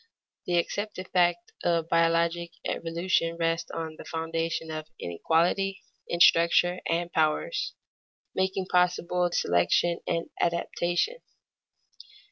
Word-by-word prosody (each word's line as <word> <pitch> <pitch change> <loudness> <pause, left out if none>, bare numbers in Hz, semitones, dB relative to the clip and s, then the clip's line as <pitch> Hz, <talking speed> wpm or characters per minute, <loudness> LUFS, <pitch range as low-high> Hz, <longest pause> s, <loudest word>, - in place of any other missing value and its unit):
The 175 - +2
accepted 190 +2 -2
fact 175 -1 +1
of 170 -2 +1
biologic 170 +1 +1
evolution 170 0 -1
rests 165 0 0
on 160 -1 -5
the - - -9
foundation 165 0 -3
of 155 0 -5
inequality 170 - 0 0.2
in 170 - -2
structure 175 +1 +5
and 170 +1 0
powers, 160 - 0 0.6
making 190 0 0
possible 180 0 +1
selection 170 - +2
and 165 - -2
adaptation. 175 - 0
170 Hz, 100 wpm, -27 LUFS, 165-180 Hz, 0.6 s, structure